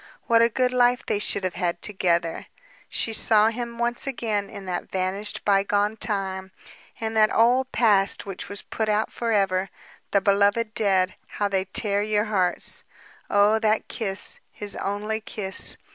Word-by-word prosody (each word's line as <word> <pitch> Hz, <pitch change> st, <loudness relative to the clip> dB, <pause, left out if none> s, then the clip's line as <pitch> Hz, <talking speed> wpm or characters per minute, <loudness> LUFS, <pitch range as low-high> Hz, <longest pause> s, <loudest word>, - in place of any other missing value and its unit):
What 230 Hz, 0 st, +4 dB
a 230 Hz, -, +5 dB
good 255 Hz, +1 st, 0 dB
life 245 Hz, 0 st, +3 dB
they 205 Hz, -, 0 dB
should 205 Hz, -, -1 dB
have 185 Hz, -1 st, -2 dB
lived 175 Hz, -2 st, -2 dB
together! 175 Hz, -5 st, 0 dB, 0.4 s
She 225 Hz, -, -1 dB
saw 220 Hz, 0 st, +4 dB
him 235 Hz, 0 st, -5 dB
once 240 Hz, +3 st, -1 dB
again 215 Hz, -6 st, -2 dB
in 195 Hz, -, -9 dB
that 180 Hz, -1 st, -4 dB
vanished 190 Hz, +2 st, -3 dB
bygone 205 Hz, +1 st, +2 dB
time, 190 Hz, -3 st, -3 dB, 0.5 s
in 225 Hz, 0 st, -3 dB
that 215 Hz, -1 st, +4 dB
old 250 Hz, +3 st, +3 dB
past 205 Hz, -4 st, +3 dB
which 195 Hz, -2 st, -7 dB
was 200 Hz, 0 st, -4 dB
put 220 Hz, -1 st, -3 dB
out 210 Hz, +1 st, +1 dB
forever. 195 Hz, -5 st, 0 dB, 0.4 s
The 200 Hz, -, +3 dB
beloved 205 Hz, +3 st, +2 dB
dead 190 Hz, -4 st, +2 dB, 0.2 s
how 205 Hz, -1 st, +1 dB
they 190 Hz, -1 st, 0 dB
tear 200 Hz, +1 st, +1 dB
your 210 Hz, 0 st, +1 dB
hearts! 185 Hz, -5 st, +1 dB, 0.5 s
Oh, 205 Hz, +2 st, +4 dB
that 220 Hz, -1 st, +1 dB
kiss, 195 Hz, -3 st, -4 dB
his 205 Hz, -1 st, -3 dB
only 210 Hz, +2 st, -2 dB
kiss! 195 Hz, -3 st, -3 dB
205 Hz, 160 wpm, -24 LUFS, 195-225 Hz, 0.5 s, a